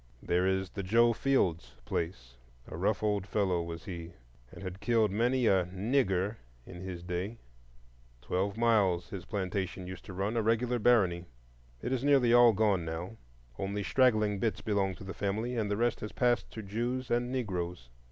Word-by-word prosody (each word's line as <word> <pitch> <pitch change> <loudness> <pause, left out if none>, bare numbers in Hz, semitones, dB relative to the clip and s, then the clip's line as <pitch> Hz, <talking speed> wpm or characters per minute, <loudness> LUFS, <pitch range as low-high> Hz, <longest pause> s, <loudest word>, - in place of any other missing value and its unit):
There 90 +2 +1
is 95 -1 0
the 100 - -4
"Joe 115 +5 +4
Fields 100 -11 0
place"; 65 -8 -4 0.3
a - - -7
rough - - 0
old 105 -2 0
fellow 95 -4 +1
was 85 -1 -7
he, 85 -2 -7 0.4
and - - -10
had 95 0 -6
killed 110 -1 +2
many 120 +4 +1
a 95 -4 +4
"nigger" 100 +1 0 0.3
in 90 -1 -10
his 90 -2 -6
day. 90 +6 -3 0.9
Twelve 95 +8 -1
miles 105 -7 +2
his 95 -3 -6
plantation 95 -2 -3
used 95 +1 -8
to 95 - -8
run,—a 105 +5 -1
regular 115 +2 +1
barony. 95 -7 +3 0.6
It 130 - -1
is 130 -1 -1
nearly 135 -4 +4
all 120 -1 +8
gone 105 -4 +2
now; 85 +6 -5 0.4
only 100 +1 -2
straggling 110 -5 +3
bits 110 +1 -1
belong 100 -3 0
to 95 - -11
the 95 0 -6
family, 110 +5 -2
and 110 -3 -1
the 100 - 0
rest 120 0 +1
has 105 - -6
passed 120 -1 +1
to 110 - -8
Jews 120 +5 -3
and 120 +1 +1
Negroes. 90 - -3
100 Hz, 170 wpm, -31 LUFS, 90-115 Hz, 0.9 s, all